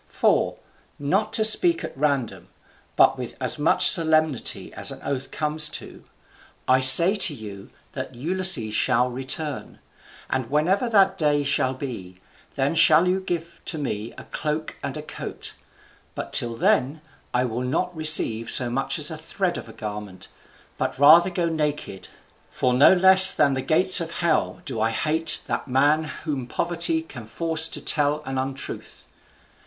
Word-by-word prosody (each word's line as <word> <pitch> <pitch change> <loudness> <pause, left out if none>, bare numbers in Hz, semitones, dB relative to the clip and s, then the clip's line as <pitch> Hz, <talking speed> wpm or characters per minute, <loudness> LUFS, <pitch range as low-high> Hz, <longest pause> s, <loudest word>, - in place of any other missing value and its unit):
For, - - -1 0.4
not 195 +10 -2
to 220 - +3
speak 340 +10 +3
at - - -8
random, 140 -4 -3 0.5
but - - +2
with - - -8
as - - 0
much - - +4
solemnity 155 -5 +2
as - - -2
an - - -10
oath 135 -1 -5
comes 150 0 -2
to, - - -9 0.6
I 130 0 +3
say 170 +9 +8
to 170 -7 +1
you 100 -4 -12 0.2
that - - -8
Ulysses 165 - +2
shall 125 +2 0
return; 135 +4 -5 0.5
and 130 -3 -4
whenever 185 - -1
that 195 -3 +1
day 145 -2 0
shall 135 -2 -1
be, 110 -10 -9 0.4
then 140 +1 -1
shall 160 +1 +4
you 185 +1 -1
give 170 -3 -7
to 160 - -3
me 115 -6 -6
a - - -10
cloak 155 +1 -6
and - - -6
a - - -8
coat; - - -9 0.6
but - - -8
till 120 -1 +1
then, 160 - -1 0.3
I 125 +1 -1
will 120 0 -5
not 175 +8 -4
receive 155 -8 +3
so 120 -1 +3
much 135 +2 -2
as 150 +1 -3
a 160 - -7
thread 175 +2 -4
of - - -9
a - - -11
garment, 105 -3 -9 0.5
but - - -4
rather 160 +6 +5
go 175 -1 -3
naked; 150 - -5 0.4
for 130 -5 -2
no 130 +3 +5
less 190 0 +8
than 140 -2 +1
the 130 - -4
gates 185 +6 +4
of 165 - -6
hell 170 +1 -3
do 125 -8 -6
I 110 - 0
hate 155 +7 -2
that - - -5
man 145 +4 0 0.2
whom 140 -6 -5
poverty 170 +1 -2
can 120 -8 -12
force 160 +5 -2
to - - -6
tell 150 0 -1
an 135 0 -5
untruth. 135 +1 -7
150 Hz, 165 wpm, -22 LUFS, 130-170 Hz, 0.6 s, say